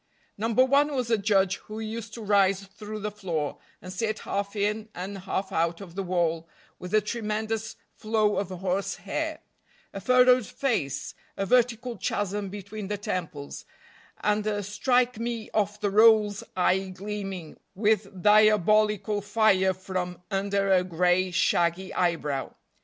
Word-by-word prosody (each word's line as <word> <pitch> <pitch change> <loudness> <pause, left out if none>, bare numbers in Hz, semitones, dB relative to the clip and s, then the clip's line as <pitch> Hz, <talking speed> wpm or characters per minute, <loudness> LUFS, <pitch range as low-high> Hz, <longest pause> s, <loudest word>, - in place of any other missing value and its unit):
No. 220 +2 -2
1 275 +5 +4
was 250 -3 -1
a 225 - +4
judge 195 -2 +2
who 215 +1 -9
used 220 0 -6
to 230 - -7
rise 195 -1 +3
through 210 +2 -8
the 210 +1 -3
floor, 170 -8 -3 0.2
and 185 0 -7
sit 215 +3 -1
half 200 +1 -3
in 210 +1 -1
and 190 +3 -5
half 190 +1 -3
out 170 +1 0
of 185 -4 -10
the 195 - -3
wall, 170 -3 -1 0.3
with 180 - -7
a 215 - +5
tremendous 220 0 -3 0.2
flow 215 -1 +1
of 200 - -1
horse 185 +1 -2
hair, - - -4 0.5
a 195 - -6
furrowed 250 0 +5
face, 185 - -2 0.2
a 195 - -1
vertical 245 +1 +1
chasm 205 0 -2
between 200 +1 -7
the 205 +1 -2
temples, 165 -8 -5 0.6
and 210 0 +1
a 205 -1 -1
strike 245 +4 +1
me 230 -1 -4
off 210 0 0
the 205 -1 0
rolls 210 -1 +5
eye 190 +1 +2
gleaming 195 -3 -6 0.2
with 200 -3 0
diabolical 210 0 +4
fire 205 -2 +3
from 185 -1 -4
under 195 0 0
a 185 -1 +4
gray, 180 +1 +2
shaggy 175 +1 +1
eyebrow. 150 -6 -1
205 Hz, 145 wpm, -27 LUFS, 185-215 Hz, 0.6 s, a